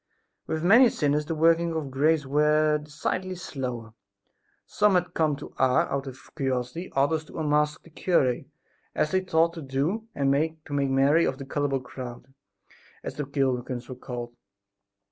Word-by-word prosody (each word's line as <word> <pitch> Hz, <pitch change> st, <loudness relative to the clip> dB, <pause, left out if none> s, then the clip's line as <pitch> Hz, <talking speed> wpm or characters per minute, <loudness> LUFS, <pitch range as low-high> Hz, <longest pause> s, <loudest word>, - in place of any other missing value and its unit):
With 160 Hz, 0 st, -2 dB
many 235 Hz, +7 st, +7 dB
sinners 150 Hz, -3 st, 0 dB
the 165 Hz, -, -2 dB
workings 165 Hz, +1 st, +3 dB
of 150 Hz, -4 st, -3 dB
grace 150 Hz, +3 st, +2 dB
were 150 Hz, +2 st, +3 dB
decidedly 160 Hz, +5 st, -3 dB
slower. 125 Hz, -9 st, -5 dB, 0.7 s
Some 210 Hz, -2 st, +2 dB
had 180 Hz, -1 st, 0 dB
come 155 Hz, -3 st, +1 dB
to -, -, -10 dB
Ars 130 Hz, -1 st, +3 dB
out 140 Hz, 0 st, -2 dB
of 130 Hz, 0 st, -11 dB
curiosity, 130 Hz, +4 st, -2 dB
others 145 Hz, +3 st, +2 dB
to -, -, -11 dB
unmask 150 Hz, -1 st, +1 dB
the 165 Hz, -, -17 dB
cure, 145 Hz, -7 st, +2 dB, 0.6 s
as 155 Hz, -, +1 dB
they 185 Hz, -, +2 dB
thought 165 Hz, -2 st, +2 dB
to 165 Hz, -, -7 dB
do, 150 Hz, +11 st, -2 dB
and 140 Hz, -1 st, +2 dB, 0.3 s
to 145 Hz, -, -7 dB
make 140 Hz, -1 st, +1 dB
merry 140 Hz, +5 st, +4 dB
over 130 Hz, -, -2 dB
the 135 Hz, -, -7 dB
"gullible 140 Hz, -1 st, -1 dB
crowd" 125 Hz, 0 st, -9 dB, 0.7 s
as -, -, -5 dB
the 145 Hz, -2 st, -4 dB
pilgrims 130 Hz, -3 st, -1 dB
were 130 Hz, -, -6 dB
called. 120 Hz, -1 st, -7 dB
145 Hz, 165 wpm, -26 LUFS, 135-160 Hz, 0.7 s, many